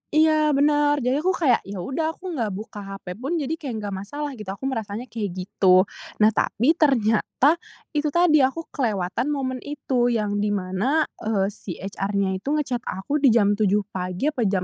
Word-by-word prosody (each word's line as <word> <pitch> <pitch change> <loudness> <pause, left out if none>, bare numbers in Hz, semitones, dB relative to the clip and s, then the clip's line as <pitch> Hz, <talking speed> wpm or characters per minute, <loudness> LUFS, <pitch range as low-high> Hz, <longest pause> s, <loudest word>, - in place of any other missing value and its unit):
iya, 310 -1 +4
bener, 290 0 +3
jadi 260 +4 +1
aku 370 +2 +2
kayak, 265 -9 +3
ya 200 -1 -6
udah 320 +4 -2
aku 370 -1 -7
nggak 230 -7 -1
buka 210 0 -8
HP 195 0 -9
pun 275 +7 -2
jadi 290 0 -2
kayak 260 -7 -5
nggak 200 -1 -4
masalah 290 +8 -5
gitu, 215 -5 -9
aku 195 +7 -7
merasanya 225 -2 -3
kayak 210 -4 -3
gitu. 185 0 +4 0.4
Nah, 220 - +6
tapi 245 +9 +2
ternyata, 275 +2 +2 0.3
itu 300 0 0
tadi, 340 -4 +5
aku 270 +5 +1
kelewatan 215 - -1
momen 260 -3 -2
itu. 265 -4 -1
Yang 215 -4 0
di 210 0 +1
mana, 200 +12 +1 0.2
eee, 205 -2 0
si 180 -3 -8
HR-nya 195 0 -2
itu 235 - -17
nge-chat 265 -5 -1
aku 200 +11 -2
di 275 - +4
jam 210 -3 +4
7 205 0 +3
pagi 185 +10 -2
apa 240 -7 0
jam 190 -2 0
240 Hz, 185 wpm, -24 LUFS, 200-295 Hz, 0.4 s, Nah